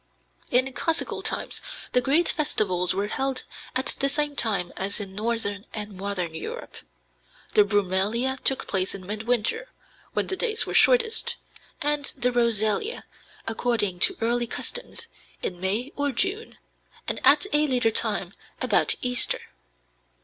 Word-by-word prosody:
In 255 +2 +2
classical 330 +3 -1
times - - -2 0.3
the 250 - +3
great 300 +7 +3
festivals 185 - +1
were 200 +1 0
held 265 +5 -1 0.3
at 260 +1 +1
the 275 - +3
same 295 0 +1
time 195 -8 0
as 200 +2 -2
in 195 -2 -5
northern 210 -1 -2
and 210 -2 -6
modern 185 -3 -3
Europe. 160 - -7 0.8
The 210 - +7
brumalia 205 +6 +1
took 270 - +2
place 190 0 0
in 190 -2 -8
midwinter, 230 - -1 0.4
when - - +1
the 380 - -2
days 440 +2 +1
were - - -5
shortest, 465 -3 +4 0.5
and 295 -1 +1
the 250 -1 +1
rosalia, 235 - +1 0.4
according 225 -5 0
to 380 - +5
early 240 +1 +1
custom - - -4 0.5
in 180 - -3
May 215 +9 -1
or 285 0 0
June, 385 - -1 0.5
and - - 0
at - - +6
a 300 +1 +4
later 250 -4 +2
time - - -1 0.3
about - - +2
Easter. 250 -1 +3
235 Hz, 140 wpm, -25 LUFS, 205-280 Hz, 0.8 s, The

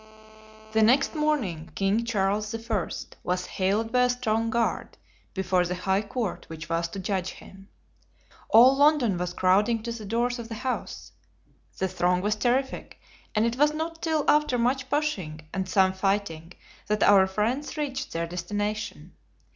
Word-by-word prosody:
The 220 0 +2
next 255 +6 +4
morning 250 - -1
King 200 +4 +1
Charles 210 0 0
I. 225 -5 -2 0.3
was 180 0 -1
haled 205 +4 -1
by 250 0 +4
a - - +1
strong 230 -2 0
guard 230 0 -1 0.4
before 185 -1 +1
the 180 +1 -2
high 190 +2 0
court 215 -1 -4
which 160 0 -8
was 165 0 0
to 195 +4 -7
judge 190 -1 -2
him. 195 0 -14 0.8
All 250 +4 +7
London 280 - +3
was 180 0 -3
crowding 210 +5 +2
to 235 - -4
the 230 -2 -7
doors 240 +3 0
of 230 - -6
the 225 - -5
house. 255 - -4 0.7
The 190 - 0
throng 180 0 +1
was 210 +2 0
terrific, 250 +5 -1 0.4
and 215 +1 +3
it 235 +1 -1
was 295 +2 +3
not 325 +1 -4
till 315 -3 0
after 300 -4 +3
much 255 +2 0
pushing 195 - -2
and 190 -1 -3
some 190 -1 +3
fighting 190 -4 -2 0.3
that 210 0 +1
our 195 -2 +6
friends 230 +11 -2
reached 275 -3 -3
their 165 0 -2
destination. 205 +5 -4
215 Hz, 160 wpm, -26 LUFS, 190-245 Hz, 0.8 s, All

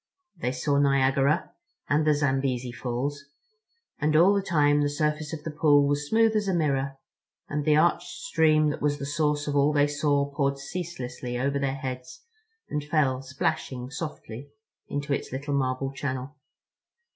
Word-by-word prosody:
They 125 -7 -2
saw 140 +2 0
Niagara 140 +3 +2 0.4
and 150 +2 +2
the 150 - +5
Zambesi 135 -3 0
Falls; 125 +5 -4 0.7
and 150 0 +1
all 175 +6 +6
the 200 - +1
time 145 -6 +3
the 145 - +1
surface 150 +1 -1
of 155 -2 -6
the 160 - -4
pool 145 -2 +4
was 145 +1 -1
smooth 225 0 +3
as 210 -1 +1
a 190 - +1
mirror 140 -4 0 0.5
and 145 0 -2
the 150 - +4
arched 170 +3 +2
stream 155 - +2
that - - -6
was 145 0 +1
the 140 - -5
source 150 0 0
of 145 - -1
all 140 +1 +4
they 145 -1 +3
saw 145 -1 +1
poured 140 -1 0
ceaselessly 135 -6 -5
over 140 +2 0
their 135 -1 -1
heads 135 - -6 0.5
and 150 - -3
fell 145 -4 +1
splashing 130 -1 -3
softly 140 -3 -7 0.4
into 145 0 -2
its - - -3
little 140 +3 -3
marble 135 0 -1
channel. 130 +1 -4
145 Hz, 165 wpm, -26 LUFS, 135-150 Hz, 0.7 s, all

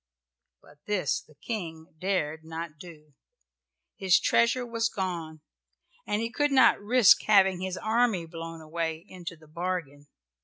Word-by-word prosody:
But 145 0 -20
this 190 -9 0
the 155 - -22
King 165 -3 -6
dared 160 -5 -1
not 160 -1 -7
do. 155 -4 -13 0.8
His 190 -2 +4
treasure 235 +2 +2
was 230 -1 -1
gone 170 -6 -4 0.7
and 210 +2 0
he 230 - -3
could 290 +3 +1
not 265 -5 +5
risk 220 -1 +6
having 190 -3 +5
his 185 -1 -3
army 220 -5 +1
blown 165 0 -8
away, 160 +1 -4
into 175 -3 -8
the 155 -1 -19
bargain. 155 -3 -4
175 Hz, 140 wpm, -28 LUFS, 160-210 Hz, 0.8 s, risk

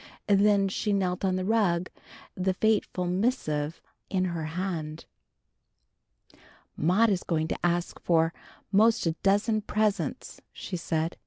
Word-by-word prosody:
Then 200 -1 +4
she 205 +2 -1
knelt 185 -2 0
on 190 -1 +1
the 185 0 -2
rug, 185 -5 +1 0.4
the 185 0 -1
fateful 210 -4 +1
missive 175 - -1 0.3
in 185 -1 +1
her 170 -3 -3
hand. 160 -2 -4 1.7
"Maudie 205 +7 +3
is 180 - -2
going 160 -2 -1
to - - -3
ask 175 0 0
for 165 -1 +2 0.4
'most 220 +2 +4
a 165 - +2
dozen 205 +2 +2
presents," 210 0 -2
she 185 - -6
said. 165 -1 -2
185 Hz, 130 wpm, -27 LUFS, 170-205 Hz, 1.7 s, Then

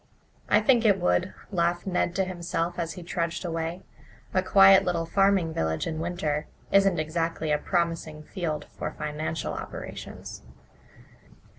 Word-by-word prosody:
"I - - +5
think 245 -4 +4
it 205 -4 +4
would," 90 0 +1 0.2
laughed 175 -1 0
Ned 180 -2 0
to 195 - +2
himself, 175 -1 -3
as 165 -1 -2
he 180 - -9
trudged 170 +1 -2
away. 165 +2 -3 0.5
"A 185 - +3
quiet 195 0 +7
little 175 -3 0
farming 195 -2 +2
village 80 - -1
in 160 -1 -3
winter 160 -3 -2 0.2
isn't 195 -2 +4
exactly 160 0 -1
a 150 - +2
promising 165 -3 -1
field 155 -5 -3
for - - -3
financial 150 +1 -3
operations." - - -7
170 Hz, 140 wpm, -27 LUFS, 160-185 Hz, 0.5 s, quiet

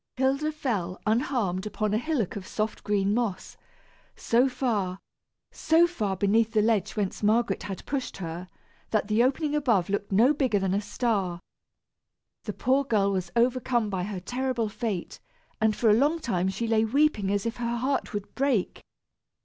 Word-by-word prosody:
Hilda 275 +4 +1
fell, 210 - -3
unharmed, 215 -4 0
upon 210 0 -2
a 215 - +2
hillock 245 - -1
of 195 -2 -6
soft 215 0 -3
green 205 -1 +1
moss, 225 -5 -2 0.6
so 245 +3 +2
far, 210 -8 -1 0.5
so 325 +2 +4
far 215 - -2
beneath 220 +3 +2
the 215 - +4
ledge 210 -3 +1
whence 205 -3 -2
Margaret 225 +3 +2
had 195 -2 -6
pushed 275 -3 -3
her, 175 0 -6 0.4
that 215 -1 0
the 215 +2 +3
opening 290 +4 0
above 230 - +1
looked 205 0 -2
no 230 +9 +5
bigger 260 -8 +1
than 190 -1 0
a 200 - +1
star. 205 -5 -1 1.1
The 210 - -3
poor 265 +6 +2
girl 205 -6 +1
was 185 -2 -2
overcome 240 -2 +1
by 180 -2 -2
her 200 -2 -4
terrible 245 +2 -2
fate, 210 -4 -4 0.4
and 215 -1 +3
for 225 -3 +3
a - - +6
long 290 +9 +3
time 190 - -1
she 195 +5 -3
lay 225 -1 +2
weeping 230 -4 +2
as 205 +1 0
if 230 - -3
her 235 -1 -2
heart 265 +3 -1
would 205 -3 -5
break. 265 -8 0
220 Hz, 170 wpm, -27 LUFS, 200-255 Hz, 1.1 s, a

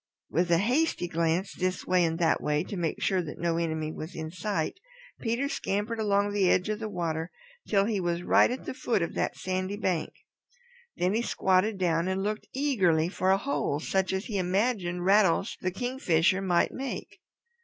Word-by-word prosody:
With 175 +3 +1
a 170 - +5
hasty 245 - +1
glance 170 +3 0
this 185 0 -2
way 180 -1 +3
and 165 -1 0
that 165 -2 +2
way 150 +1 +1
to 200 - -6
make 170 -3 -2
sure 190 -2 +2
that 160 -3 -7
no 170 0 0
enemy 160 -2 -1
was 160 +3 -7
in 160 0 -5
sight, 185 - -2 0.4
Peter 235 +4 -1
scampered 220 -4 -2
along 205 -1 +1
the 195 -3 +3
edge 185 +3 +2
of 215 0 -1
the 220 -1 -4
water 165 -3 -2 0.4
till 200 -2 +3
he 210 -2 0
was 175 -1 -1
right - - +5
at 250 +2 -5
the - - -4
foot 230 -7 0
of 170 - -3
that - - -1
sandy 185 +2 -2
bank. 180 -6 -1 0.9
Then 180 +2 +1
he 225 - +1
squatted 190 -1 +1
down 170 -2 +1
and 190 +1 -1
looked 210 +1 -3
eagerly 190 - +2
for 185 0 0
a 190 - +5
hole 195 - -1
such 190 +3 0
as 190 +2 -2
he 205 -4 -2
imagined 180 -2 0
Rattles 195 0 +3
the 185 - 0
Kingfisher 185 -5 +1
might 180 -3 +2
make. 270 0 -6
185 Hz, 190 wpm, -28 LUFS, 170-210 Hz, 0.9 s, a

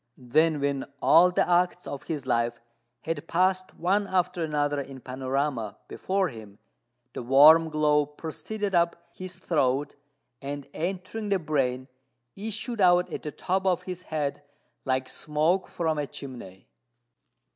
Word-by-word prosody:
Then 150 +5 +2
when 140 -1 -1
all 170 +3 +6
the 180 - +1
acts 180 0 +2
of 140 - -5
his 150 -5 -4
life 120 -1 0 0.4
had 165 +1 -4
passed 185 +1 +1
one 195 +4 +1
after 180 -2 0
another 145 -2 0
in 135 -1 -9
panorama 130 -3 -2
before 190 -1 -1
him, 110 -5 -11 0.6
the - - -5
warm 150 +6 +7
glow 150 -1 +2
proceeded 195 +7 -5
up 170 -1 +3 0.2
his 185 -1 -8
throat, 140 -3 0 0.5
and, 140 0 -6
entering 190 +5 -4
the 200 - +3
brain, 135 -6 -1 0.5
issued 220 +2 -4
out 180 -1 +4
at - - -4
the 150 - -5
top 190 +4 -1
of 180 -1 +1
his 180 -1 -6
head 150 -5 -3 0.4
like 130 -1 0
smoke 155 +7 0
from 160 -3 -1
a 145 - -2
chimney. 120 -11 -10
155 Hz, 140 wpm, -27 LUFS, 135-180 Hz, 0.6 s, warm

